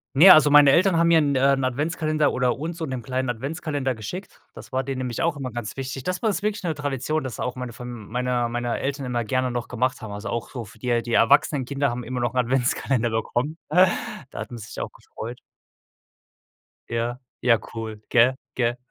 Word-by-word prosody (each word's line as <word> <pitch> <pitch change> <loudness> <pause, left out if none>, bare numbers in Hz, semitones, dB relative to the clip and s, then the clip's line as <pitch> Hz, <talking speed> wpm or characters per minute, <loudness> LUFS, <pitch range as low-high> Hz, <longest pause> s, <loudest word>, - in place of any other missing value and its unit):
Ne, 180 +7 +10
also 155 -1 +6
meine 145 -1 +8
Eltern 180 +2 +4
haben 170 0 +4
mir 165 - +6
'n 140 -2 +1
äh, 135 +1 +4
'n 135 -1 0
Adventskalender 155 +3 0
oder 125 0 +1
uns 165 +3 -4
so 165 - -5
und 135 - -6
dem 125 -3 -4
Kleinen 130 +2 -2
'n 120 - 0
Adventskalender 140 0 -2
geschickt, 150 - -8
das - - -12
war 130 +1 0
denen 135 -1 -4
nämlich 125 -3 -3
auch 165 -2 +1
immer 130 -2 -4
ganz 115 -3 -5
wichtig. 135 -1 -5
Das 185 0 -2
bei 225 - +1
uns 205 - 0
wirklich 210 -2 -2
'ne 165 -2 0
Tradition, 145 +1 -2
dass 130 -4 -5
da - - -4
auch 125 0 -3
meine 125 -2 -6
Fam 120 -3 -8
meine 125 0 0
meine 120 0 -2
Eltern 135 0 -3
immer 120 -1 -1
gerne 130 +2 0
noch 120 0 -3
gemacht 125 +1 -1
haben, 110 -3 -6
also 105 +2 -5
auch 115 -1 -3
so 120 -3 -6
für 105 +2 -16
die 125 - -3
äh, 120 -1 +2
die 120 0 -5
erwachsenen 135 +3 +4
Kinder 140 +1 0
haben 120 0 -4
immer 125 +2 -4
noch 120 -1 0
'n 130 - -4
Adventskalender 125 -1 +1
bekommen. 120 +7 -2 0.7
Da - - -9
hat - - -5
man 120 - -7
sich 105 -1 -9
ja - - -3
auch - - -7
gefreut. 120 +3 -9 1.5
Ja, 120 +1 -2 0.2
ja, 115 -2 +5 0.2
cool, 110 -2 -6
gell, 125 +2 +5 0.2
gell? 120 0 0
130 Hz, 230 wpm, -24 LUFS, 120-145 Hz, 1.5 s, Ne